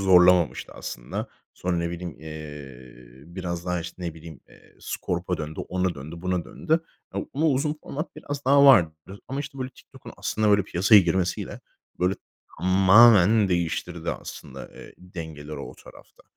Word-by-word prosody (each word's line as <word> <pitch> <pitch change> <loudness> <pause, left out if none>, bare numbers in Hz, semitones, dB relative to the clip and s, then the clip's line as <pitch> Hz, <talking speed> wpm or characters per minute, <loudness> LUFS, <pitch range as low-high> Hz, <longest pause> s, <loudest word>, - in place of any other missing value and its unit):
zorlamamıştı 90 -2 +4
aslında. - - -6 0.3
Sonra 90 -1 -2
ne 85 0 -1
bileyim, 85 -2 -6
eee, 65 -5 -10
biraz 85 -2 -4
daha, 90 -1 0
işte, 80 - -7
ne 85 -2 -4
bileyim, 80 -3 -11
eee, - - -21
Scorp'a 90 +1 -3
döndü, 75 0 -5
ona 90 -1 0
döndü, 75 +3 -8
buna 90 -1 -1
döndü. - - -5 0.4
Ya - - -1
ama 155 +4 +1
uzun 150 +1 +1
format 155 +5 -6
biraz 145 -1 -6
daha 140 +2 +6
vardı. 90 - +7 0.4
Ama, 135 +2 -3
işte, 140 -1 -8
böyle, 130 0 -4
TikTok'un 125 - -14
aslında, 110 0 0
böyle, 100 0 +5
piyasaya 100 +3 +5
girmesiyle, 90 0 -1 0.4
böyle, 90 +2 +2 0.4
tamamen 100 +2 +6
değiştirdi 85 -1 -2
aslında, - - -8
eee, - - -12
dengeleri 80 -5 -8
o - - -8
tarafta. - - -17
90 Hz, 150 wpm, -25 LUFS, 80-105 Hz, 0.4 s, vardı